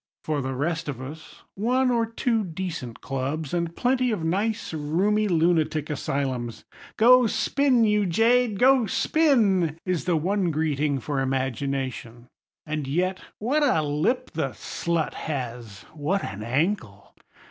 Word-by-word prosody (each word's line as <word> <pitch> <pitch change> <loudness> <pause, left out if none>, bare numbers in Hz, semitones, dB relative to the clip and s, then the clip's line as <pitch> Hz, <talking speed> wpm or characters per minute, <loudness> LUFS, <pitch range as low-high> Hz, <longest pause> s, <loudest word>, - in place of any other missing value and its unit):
For 150 -2 -1
the 130 0 -3
rest 160 +3 -2
of 130 -4 -5
us, 145 +5 -10
one 250 +5 +1
or 230 -2 +1
two 230 -1 0
decent 165 - -5
clubs, 140 +3 -3
and 170 -1 -1
plenty 255 0 +1
of 210 -8 -2
nice 200 +5 -1
roomy 185 +8 +1
lunatic 160 -3 +1
asylums. 130 -5 -3 0.3
"Go 250 +2 +6
spin, 260 +1 +2
you 210 -2 +2
jade, 225 +4 +3
go 255 0 +4
spin!" 205 - +2
is 180 -3 -1
the 175 -3 +2
one 185 +3 0
greeting 150 -2 0
for 140 +3 -2
Imagination. 130 -2 -3 0.4
And 150 -2 -3
yet—what 185 - -1
a 165 - +3
lip 150 - 0
the - - -2
slut 170 -2 -2
has! 120 -8 -5
What 160 +6 -1
an 100 0 -6
ankle! 120 - -2
165 Hz, 135 wpm, -25 LUFS, 140-210 Hz, 0.4 s, Go